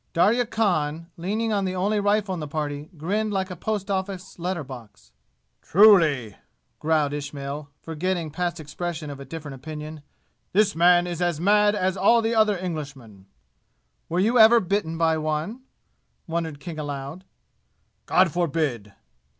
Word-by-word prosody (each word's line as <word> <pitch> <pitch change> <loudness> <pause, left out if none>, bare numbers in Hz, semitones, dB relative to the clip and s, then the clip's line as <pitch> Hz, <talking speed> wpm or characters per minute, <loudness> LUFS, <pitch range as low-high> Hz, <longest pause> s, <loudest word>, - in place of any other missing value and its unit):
Darya 220 +8 +3
Khan, 170 -7 -1
leaning 215 +6 -2
on 200 -1 +1
the 185 -1 -2
only 205 +3 +1
rifle 205 -1 +1
in 180 - -4
the 150 - -5
party, 145 0 -4
grinned 210 +8 -1
like 190 -1 -2
a - - -5
post 205 +2 -3
office 190 -1 -4
letter 175 -2 -2
box. 115 - -12 0.5
"Truly," 160 - +5 0.4
growled 155 -2 +1
Ismail, 145 0 -5
forgetting 165 0 -2
past 175 +1 -2
expression 155 0 -5
of 140 - -9
a 140 - -8
different 150 0 -7
opinion, 150 +3 -8 0.5
"this 210 +1 +3
man 175 +1 +5
is 175 -1 -4
as 175 -3 0
mad 205 +3 +4
as 190 -2 0
all 225 +5 +4
the 225 +1 0
other 215 -3 +3
Englishmen." 140 - -7 0.8
"Were 175 - 0
you 230 +6 +3
ever 225 +2 +8
bitten 180 -4 -1
by 160 -1 +2
one?" 155 +10 -3 0.6
wondered 165 -3 -3
King 155 +2 -7
aloud. 145 +3 -5 0.8
"God 185 -2 +4
forbid!" 145 - -1
170 Hz, 150 wpm, -24 LUFS, 150-195 Hz, 0.8 s, ever